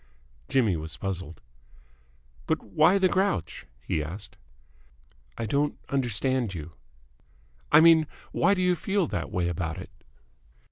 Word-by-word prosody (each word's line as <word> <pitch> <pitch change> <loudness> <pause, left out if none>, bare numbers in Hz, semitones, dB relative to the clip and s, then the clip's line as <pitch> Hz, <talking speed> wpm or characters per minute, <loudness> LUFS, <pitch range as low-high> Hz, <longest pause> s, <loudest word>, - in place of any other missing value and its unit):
Jimmy 115 -8 +2
was 80 +1 -6
puzzled. 90 -3 -5 1.1
"But - - 0
why 155 - +4
the 190 -1 +4
grouch?" 190 - -1 0.2
he 75 - -1
asked. 90 +7 -7 1.0
"I 115 - -3
don't 140 +6 0
understand 125 -4 0
you." 80 0 -7 1.0
"I 155 - +8
mean, 160 -2 +6 0.2
why 200 - +3
do 185 - 0
you 180 0 +3
feel 195 +2 0
that - - -3
way 90 -1 -1
about 85 0 -3
it?" 95 - -9
115 Hz, 130 wpm, -27 LUFS, -, 1.1 s, I